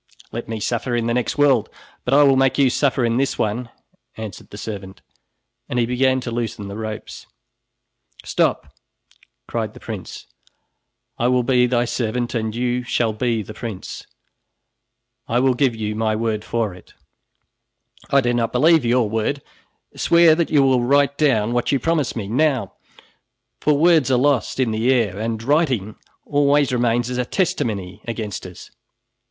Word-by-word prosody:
"Let 115 Hz, 0 st, -6 dB
me 110 Hz, -1 st, -3 dB
suffer 120 Hz, +3 st, -2 dB
in 120 Hz, -1 st, 0 dB
the 120 Hz, -, 0 dB
next 125 Hz, +3 st, -1 dB
world, 140 Hz, -6 st, +3 dB, 0.4 s
but 125 Hz, -, 0 dB
I 145 Hz, -, +7 dB
will 135 Hz, -1 st, +5 dB
make 135 Hz, 0 st, +2 dB
you 135 Hz, -3 st, +4 dB
suffer 130 Hz, -2 st, +1 dB
in 115 Hz, 0 st, +1 dB
this 135 Hz, +1 st, 0 dB
one," 115 Hz, +3 st, -2 dB, 0.5 s
answered 110 Hz, -4 st, -8 dB
the 105 Hz, -, -10 dB
servant 100 Hz, -3 st, -7 dB, 0.7 s
and 125 Hz, -, -2 dB
he 120 Hz, -, +3 dB
began 130 Hz, +2 st, +1 dB
to 120 Hz, -, -5 dB
loosen 115 Hz, -3 st, -4 dB
the 100 Hz, -, -7 dB
ropes. 110 Hz, 0 st, -7 dB, 1.0 s
"Stop!" -, -, 0 dB, 0.7 s
cried -, -, -3 dB
the -, -, -11 dB
prince, -, -, -8 dB, 0.9 s
"I 120 Hz, -, +2 dB
will 125 Hz, 0 st, +2 dB
be 125 Hz, 0 st, +3 dB
thy 120 Hz, -1 st, +1 dB
servant 120 Hz, 0 st, -2 dB
and 110 Hz, -2 st, -2 dB
you 125 Hz, +1 st, 0 dB
shall 120 Hz, -2 st, 0 dB
be 115 Hz, 0 st, -1 dB
the 110 Hz, -, -9 dB
prince. 110 Hz, -5 st, -7 dB, 1.2 s
I 120 Hz, -, +1 dB
will 130 Hz, 0 st, +3 dB
give 125 Hz, -1 st, +1 dB
you 105 Hz, -1 st, -3 dB
my 110 Hz, 0 st, 0 dB
word 110 Hz, -1 st, -2 dB
for 115 Hz, -5 st, -2 dB
it." 90 Hz, -, -17 dB, 1.1 s
"I 140 Hz, -, +4 dB
do 120 Hz, -1 st, 0 dB
not 115 Hz, -1 st, 0 dB
believe 155 Hz, +4 st, +4 dB
your 120 Hz, -1 st, +2 dB
word. 110 Hz, +6 st, -2 dB, 0.5 s
Swear 170 Hz, -1 st, +5 dB
that 165 Hz, +1 st, 0 dB
you 145 Hz, -3 st, +4 dB
will 130 Hz, -2 st, +3 dB
write 140 Hz, +3 st, +3 dB
down 120 Hz, -8 st, +2 dB
what 120 Hz, -1 st, 0 dB
you 140 Hz, -, +2 dB
promise 160 Hz, -4 st, 0 dB
me, 110 Hz, -4 st, -4 dB
now, 130 Hz, -3 st, 0 dB, 0.9 s
for 150 Hz, -1 st, +2 dB
words 160 Hz, -3 st, +4 dB
are 130 Hz, -, +3 dB
lost 135 Hz, 0 st, +1 dB
in 125 Hz, -4 st, +1 dB
the 110 Hz, +4 st, +1 dB
air, 110 Hz, -7 st, +1 dB
and 110 Hz, 0 st, -3 dB
writing 130 Hz, -, +1 dB, 0.3 s
always 145 Hz, -1 st, +2 dB
remains 120 Hz, -1 st, +1 dB
as 125 Hz, -, -2 dB
a -, -, +2 dB
testimony 115 Hz, -, -2 dB
against 110 Hz, -5 st, -5 dB
us." 90 Hz, -, -12 dB
120 Hz, 170 wpm, -21 LUFS, 110-135 Hz, 1.2 s, I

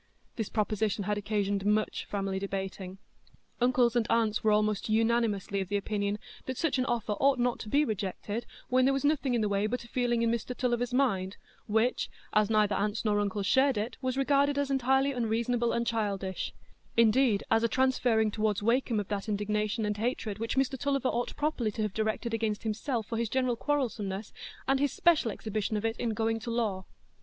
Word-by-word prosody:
This 220 Hz, -3 st, -3 dB
proposition 215 Hz, -1 st, 0 dB
had 205 Hz, +1 st, -1 dB
occasioned 205 Hz, -1 st, -1 dB
much 210 Hz, +1 st, 0 dB
family 195 Hz, -1 st, -2 dB
debating. 195 Hz, -1 st, -5 dB, 0.6 s
Uncles 245 Hz, -1 st, +3 dB
and 235 Hz, -2 st, +2 dB
aunts 225 Hz, -2 st, +2 dB
were 215 Hz, -, +4 dB
almost 210 Hz, 0 st, +1 dB
unanimously 220 Hz, -3 st, +1 dB
of 190 Hz, 0 st, -6 dB
opinion 205 Hz, 0 st, -1 dB, 0.3 s
that 260 Hz, -1 st, -3 dB
such 310 Hz, -5 st, 0 dB
an 255 Hz, -, +1 dB
offer 235 Hz, -3 st, -1 dB
ought 275 Hz, -1 st, +4 dB
not 245 Hz, 0 st, 0 dB
to 215 Hz, -, -7 dB
be 290 Hz, +6 st, +3 dB
rejected 210 Hz, +1 st, -3 dB, 0.2 s
when 255 Hz, 0 st, +3 dB
there 270 Hz, +1 st, +3 dB
was 275 Hz, -, -1 dB
nothing 285 Hz, -4 st, +2 dB
in 235 Hz, -, +1 dB
the 210 Hz, -, +1 dB
way 200 Hz, +1 st, +1 dB
but 250 Hz, +3 st, -3 dB
a -, -, -13 dB
feeling 240 Hz, -1 st, 0 dB
in 230 Hz, -, +2 dB
Mr 235 Hz, +2 st, -3 dB
Tulliver's 245 Hz, -1 st, 0 dB
mind, 205 Hz, -8 st, +1 dB, 0.3 s
which, 220 Hz, +4 st, +1 dB, 0.2 s
as 215 Hz, -1 st, +3 dB
neither 210 Hz, -2 st, +3 dB
aunts 210 Hz, +3 st, -1 dB
nor 205 Hz, -1 st, +2 dB
uncles 205 Hz, -1 st, -1 dB
shared 265 Hz, +2 st, +3 dB
it, 215 Hz, +4 st, -2 dB
was 255 Hz, 0 st, -1 dB
regarded 280 Hz, +1 st, +2 dB
as 285 Hz, -1 st, 0 dB
entirely 265 Hz, +1 st, +2 dB
unreasonable 235 Hz, 0 st, 0 dB
and 235 Hz, 0 st, 0 dB
childish,—indeed, 215 Hz, +2 st, 0 dB
as 225 Hz, 0 st, +4 dB
a -, -, +4 dB
transferring 245 Hz, -4 st, +2 dB
toward 215 Hz, -2 st, 0 dB
Wakem 235 Hz, 0 st, +2 dB
of 205 Hz, -, -4 dB
that 205 Hz, 0 st, -3 dB
indignation 210 Hz, +1 st, -1 dB
and 210 Hz, 0 st, -1 dB
hatred 220 Hz, -2 st, -2 dB
which 230 Hz, +3 st, -2 dB
Mr 265 Hz, -1 st, +1 dB
Tulliver 275 Hz, -2 st, 0 dB
ought 240 Hz, +1 st, -2 dB
properly 295 Hz, -7 st, 0 dB
to 215 Hz, -, -2 dB
have 210 Hz, -2 st, -2 dB
directed 220 Hz, +2 st, -1 dB
against 220 Hz, -2 st, -1 dB
himself 225 Hz, +2 st, -2 dB
for 230 Hz, +1 st, -3 dB
his 230 Hz, -2 st, -1 dB
general 255 Hz, -1 st, +1 dB
quarrelsomeness, 225 Hz, -7 st, -2 dB, 0.3 s
and 270 Hz, 0 st, +3 dB
his 285 Hz, -1 st, +1 dB
special 330 Hz, -9 st, +3 dB
exhibition 215 Hz, 0 st, -2 dB
of 210 Hz, -, -3 dB
it 225 Hz, +1 st, -1 dB
in 230 Hz, -2 st, -1 dB
going 225 Hz, 0 st, 0 dB
to 225 Hz, -, -6 dB
law. 215 Hz, -5 st, -1 dB
225 Hz, 190 wpm, -30 LUFS, 210-250 Hz, 0.6 s, were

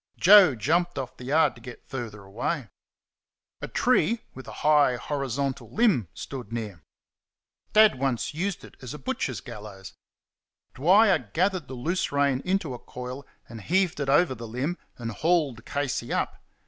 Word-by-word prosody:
Joe 185 Hz, -6 st, +8 dB
jumped 170 Hz, -, 0 dB
off 130 Hz, -3 st, -5 dB
the 125 Hz, -, -11 dB
yard 155 Hz, +5 st, +3 dB
to 120 Hz, -, -16 dB
get 120 Hz, 0 st, -11 dB
further 115 Hz, -6 st, -6 dB
away. 115 Hz, +6 st, -3 dB, 0.9 s
A -, -, -4 dB
tree, 220 Hz, +7 st, +2 dB
with 130 Hz, -, -11 dB
a -, -, -7 dB
high 150 Hz, -4 st, +5 dB
horizontal 135 Hz, 0 st, -3 dB
limb, 210 Hz, -, +2 dB
stood 125 Hz, -6 st, -7 dB
near. 105 Hz, -8 st, -5 dB, 0.9 s
Dad 215 Hz, -10 st, +6 dB
once 135 Hz, 0 st, -1 dB
used 185 Hz, +5 st, -3 dB
it -, -, -13 dB
as 125 Hz, +1 st, -7 dB
a -, -, -6 dB
butcher's 130 Hz, -2 st, -3 dB
gallows. 105 Hz, -4 st, -10 dB, 0.8 s
Dwyer 190 Hz, +9 st, +5 dB, 0.2 s
gathered 185 Hz, -3 st, +1 dB
the 130 Hz, -, -7 dB
loose 170 Hz, +9 st, -1 dB
rein 140 Hz, -2 st, +1 dB
into 180 Hz, -7 st, -1 dB
a 120 Hz, -, -7 dB
coil 125 Hz, +2 st, -8 dB, 0.2 s
and 115 Hz, -1 st, -9 dB
heaved 180 Hz, -, +1 dB
it 140 Hz, -1 st, -2 dB
over 145 Hz, +1 st, +4 dB
the 115 Hz, -2 st, -8 dB
limb, 135 Hz, +10 st, -3 dB, 0.2 s
and 115 Hz, -2 st, -5 dB
hauled 150 Hz, -, 0 dB
Casey 140 Hz, -4 st, -2 dB
up. -, -, -2 dB
135 Hz, 160 wpm, -26 LUFS, 120-170 Hz, 0.9 s, Joe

